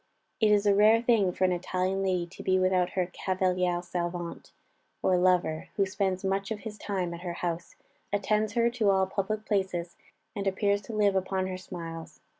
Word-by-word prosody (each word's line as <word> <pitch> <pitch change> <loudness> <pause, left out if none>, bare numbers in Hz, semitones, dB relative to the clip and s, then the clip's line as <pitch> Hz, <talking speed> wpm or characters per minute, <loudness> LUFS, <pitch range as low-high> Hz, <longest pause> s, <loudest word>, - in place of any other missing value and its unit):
It 215 - +4
is 205 0 +3
a 205 - +5
rare 215 +3 +6
thing 225 -6 +3
for 185 - -2
an 185 - +4
Italian 185 +2 -1
lady 185 -2 0
to 170 - -12
be 185 0 +2
without 185 -1 +2
her 185 -2 +1
cavaliere 180 -2 0
servente, 175 -1 -4 0.5
or 185 - +4
lover, 180 -3 +2
who 200 - +2
spends 190 -1 -1
much 195 +1 0
of 215 -2 -4
his 215 -2 -7
time 185 -4 -2
at 170 - -8
her 175 -1 -4
house, 170 0 -4 0.4
attends 210 +1 +1
her 235 0 +2
to 230 -4 +1
all 190 -1 +4
public 205 +3 -3
places, 190 -4 -1 0.4
and 200 -1 -2
appears 200 +1 +1
to 220 - -9
live 205 -2 +3
upon 190 0 0
her 185 -1 -4
smiles. 165 -3 -8
190 Hz, 190 wpm, -28 LUFS, 180-205 Hz, 0.5 s, rare